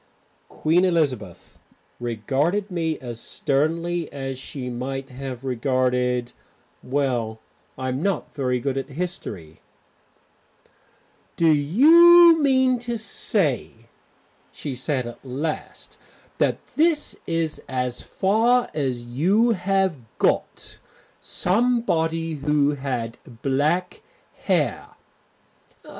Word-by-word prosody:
Queen 165 +4 +2
Elizabeth 135 - -1 0.4
regarded 140 - -1
me 165 -3 -1
as 120 -3 -7
sternly 165 +6 -1
as 135 -2 -5
she 130 -1 -7
might 135 +2 -4
have 130 -1 -7
regarded 125 -1 0 0.5
Well, 125 -5 -1 0.4
I'm 130 +1 -3
not 195 +1 -2
very 125 -3 -1
good 135 +1 -1
at 135 - -7
history. 135 - -6 1.7
"Do 165 -1 +4
you 325 - +7
mean 260 -3 +3
to 240 0 -3
say," 195 - -1 0.8
she 145 - -6
said 130 0 -2
at 120 - -9
last, 140 +5 -5 0.4
"that - - 0
that 315 -1 +2
is 165 -2 -1
as 125 -1 -2
far 230 +5 +2
as 130 -5 -2
you 185 - +2
have 190 -3 +1 0.2
got? - - -1 0.4
Somebody 180 -7 0
who 145 0 +2
had 125 -5 -4 0.2
black 150 +7 0 0.4
hair?" - - 0
145 Hz, 95 wpm, -23 LUFS, 130-185 Hz, 1.7 s, you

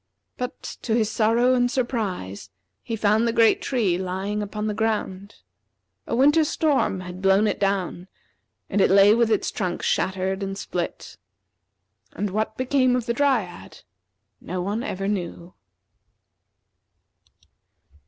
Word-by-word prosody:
But, 250 +1 -6 0.2
to 225 - 0
his 220 -2 +1
sorrow 235 +3 +3
and 245 -1 +2
surprise, 200 - -3 0.3
he 230 - -4
found 215 +2 +2
the - - +2
great 230 -1 +4
tree 205 -10 0
lying 190 +3 -3
upon 210 +1 -4
the 215 - -1
ground. 205 -3 -2 0.7
A - - -1
winter 295 +6 +5
storm 290 - 0
had 180 0 -8
blown 195 +2 +4
it - - -1
down, 195 -2 -1 0.6
and 205 - 0
it - - +4
lay 200 +2 +7
with 235 0 +2
its 215 - 0
trunk 180 -3 -3
shattered 190 +1 0
and 195 0 -4
split. 175 -3 -5 1.0
And 205 -1 -3
what 215 +2 -2
became 255 -1 +2
of 250 -2 -1
the 235 - 0
Dryad, 240 -9 -1 0.6
no 185 +1 -5
one 200 +5 -2
ever 195 -7 -3
knew. 180 -3 -4
210 Hz, 135 wpm, -24 LUFS, 190-235 Hz, 1.0 s, lay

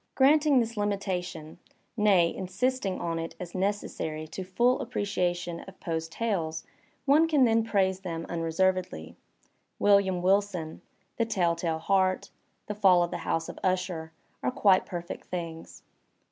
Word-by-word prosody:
Granting 285 0 +5
this 230 -1 -1
limi 205 -1 +1
tation, 180 -5 -5 0.4
nay, 195 -6 +4
insisting 195 +2 -1
on 165 -1 -2
it 165 0 -5
as 175 -1 -7
necessary 185 -5 -2
to 190 - -6
the 185 - -16
full 245 +6 +3
apprecia 200 -6 -1
tion 175 -1 -6
of 190 - -13
Poe's 165 -2 -3
tales, 165 -5 -2 0.4
one 300 +4 +5
can 295 -5 +4
then 225 -1 +3
praise 190 -4 +1
them 165 -3 -5
unreservedly. 170 - -1 0.6
'^William 195 -3 +3
Wilson," 190 -4 0 0.4
"The 230 - +2
TeU 180 -6 +2
Tale 165 -1 -1
Heart," 190 +3 +1 0.3
"The 210 - -4
FaU 190 -4 +5
of 175 - -3
the 175 - -3
House 165 0 0
of - - -8
Usher" 180 -3 -1 0.3
are 125 - 0
quite 190 +7 +3
perfect 175 0 -6
things. 165 -2 -6
185 Hz, 150 wpm, -28 LUFS, 170-205 Hz, 0.6 s, Granting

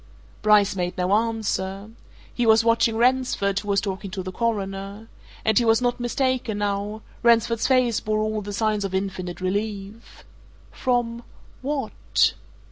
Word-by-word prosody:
Bryce 210 -1 +4
made 180 -1 -2
no 180 +1 +1
answer. 210 -2 -1 0.4
He 240 -2 0
was 220 0 +6
watching 230 -1 +2
Ransford, 240 -5 +2
who 205 - -10
was 200 -1 +2
talking 195 0 -4
to 190 0 -5
the 185 - -5
Coroner. 200 -1 -3 0.4
And 220 +1 +4
he - - +1
was 225 -1 +4
not 245 0 0
mistaken 245 -2 -1
now 205 +1 -2 0.2
Ransford's 230 -1 +3
face 255 -4 +3
bore 215 0 -1
all 215 0 -1
the 205 0 -6
signs 210 0 0
of 190 -1 -3
infinite 190 -2 -3
relief. 205 +3 -4 0.5
From 240 -2 -1 0.4
what? 280 +1 0
215 Hz, 145 wpm, -24 LUFS, 200-230 Hz, 0.5 s, was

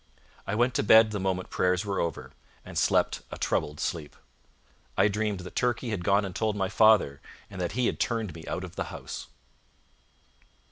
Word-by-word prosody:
I 100 - -1
went 120 +3 +2
to - - +1
bed 110 +1 +7
the 105 - -2
moment 95 -1 -2
prayers 90 +2 +1
were 100 -1 -1
over, 85 - -3 0.3
and - - -10
slept - - +2
a - - -7
troubled 75 0 -1
sleep. 75 -4 -3 0.8
I - - +5
dreamed 105 -2 -1
that 90 - -10
Turkey 120 -1 0
had 95 -5 -3
gone 100 +2 +3
and 95 -2 -7
told 110 -2 0
my 95 -2 -1
father, 105 -9 +4 0.3
and 95 -2 -6
that 90 - -2
he 125 +2 +1
had - - -1
turned 110 -7 -1
me 80 0 -10
out 95 - -3
of 90 -2 -9
the - - -2
house. - - -7
100 Hz, 190 wpm, -28 LUFS, 90-110 Hz, 0.8 s, bed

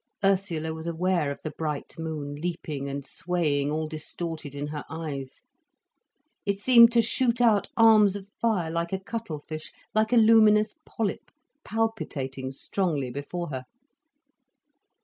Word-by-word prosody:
Ursula 180 -5 +1
was 160 +1 -7
aware 170 -2 +1
of 140 - -4
the 155 - -4
bright 150 -1 -4
moon 155 -3 -4
leaping 150 -3 -4
and 140 0 -5
swaying, 155 -5 0
all 155 +1 -1
distorted, 155 -1 -5
in 145 +1 -4
her 150 -1 -5
eyes. 145 -4 -6 1.0
It 200 0 0
seemed 235 +2 +7
to 235 -1 +5
shoot 235 +1 +1
out 225 -4 +3
arms 215 -3 +6
of 200 -1 -7
fire 200 -6 -1
like 170 0 -2
a 190 - -1
cuttle 190 -7 -5
fish, 155 0 -6 0.2
like 215 +1 +2
a 245 - +5
luminous 215 -1 +6
polyp, 215 -4 -3 0.3
palpitating 140 -13 -2
strongly 145 -3 -2
before 160 +6 -5
her. 130 -2 -5
170 Hz, 140 wpm, -27 LUFS, 150-210 Hz, 1.0 s, seemed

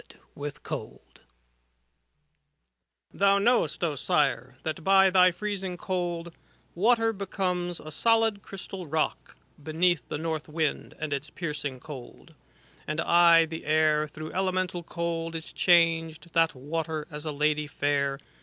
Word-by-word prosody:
IT - - -19 0.2
113 145 0 -5
H - - -13
CANZONIERE - - -26 1.9
Thou 200 0 +4
knowest, 200 -7 +2
O 165 -3 +1
Sire, 135 -5 0
that 160 +1 -4
by 195 0 +5
the 185 -1 +6
freezing 190 0 -4
cold, 175 -2 -3 0.2
' - - -36
Water 225 +4 +3
becomes 180 -3 -2
a 155 - -9
solid 225 +3 +2
crystal 190 -2 -8
rock, 155 +1 -2 0.2
Beneath 160 -1 +1
the - - -2
north 160 -1 -3
wind 155 -1 -2
and 155 -2 -3
its 140 +2 -4
piercing 145 -6 -4
cold. 130 -3 -11 0.5
And 150 +1 -2
aye 170 -1 +6
the 160 0 -7
air, 155 0 +3
through 155 +1 -8
elemental 185 -1 -1
cold. 165 0 -3
Is 160 0 -7
changed, 165 -2 +2
that 165 -2 +3
water, 155 +3 -4
as 150 0 -6
a 155 - -3
lady 150 +1 0
fair. 140 -2 0
165 Hz, 140 wpm, -27 LUFS, 150-180 Hz, 1.9 s, the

